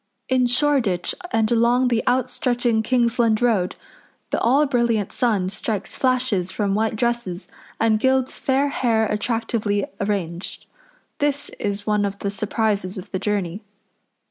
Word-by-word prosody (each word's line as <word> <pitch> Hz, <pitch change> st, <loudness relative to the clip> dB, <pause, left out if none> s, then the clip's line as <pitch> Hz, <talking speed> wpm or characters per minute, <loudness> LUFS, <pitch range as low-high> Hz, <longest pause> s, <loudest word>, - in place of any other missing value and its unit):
In 255 Hz, -1 st, +3 dB
Shoreditch 245 Hz, -, +2 dB, 0.2 s
and 220 Hz, 0 st, +1 dB
along 240 Hz, +2 st, +3 dB
the 235 Hz, -2 st, +1 dB
out 250 Hz, 0 st, +2 dB
stretching 245 Hz, -3 st, 0 dB
Kingsland 235 Hz, -1 st, +2 dB
Road 215 Hz, -7 st, +1 dB, 0.6 s
the -, -, +1 dB
all 275 Hz, +6 st, +4 dB
brilliant 235 Hz, -6 st, +1 dB
sun 215 Hz, -7 st, +1 dB
strikes 205 Hz, +1 st, -3 dB
flashes 250 Hz, -8 st, +1 dB
from 200 Hz, 0 st, -1 dB
white 220 Hz, +2 st, 0 dB
dresses 235 Hz, -5 st, -2 dB, 0.3 s
and 220 Hz, -1 st, +3 dB
gilds 260 Hz, +1 st, +1 dB
fair 275 Hz, +2 st, +1 dB
hair 230 Hz, -5 st, +1 dB
attractively 210 Hz, -1 st, -1 dB
arranged. 190 Hz, -4 st, -3 dB, 0.5 s
This 290 Hz, 0 st, 0 dB
is 205 Hz, 0 st, -2 dB
one 210 Hz, -1 st, +1 dB
of 200 Hz, 0 st, -2 dB
the 200 Hz, 0 st, -3 dB
surprises 205 Hz, -2 st, -1 dB
of 185 Hz, -, -9 dB
the 190 Hz, -, -2 dB
journey. 200 Hz, -2 st, -2 dB
225 Hz, 140 wpm, -22 LUFS, 205-245 Hz, 0.6 s, all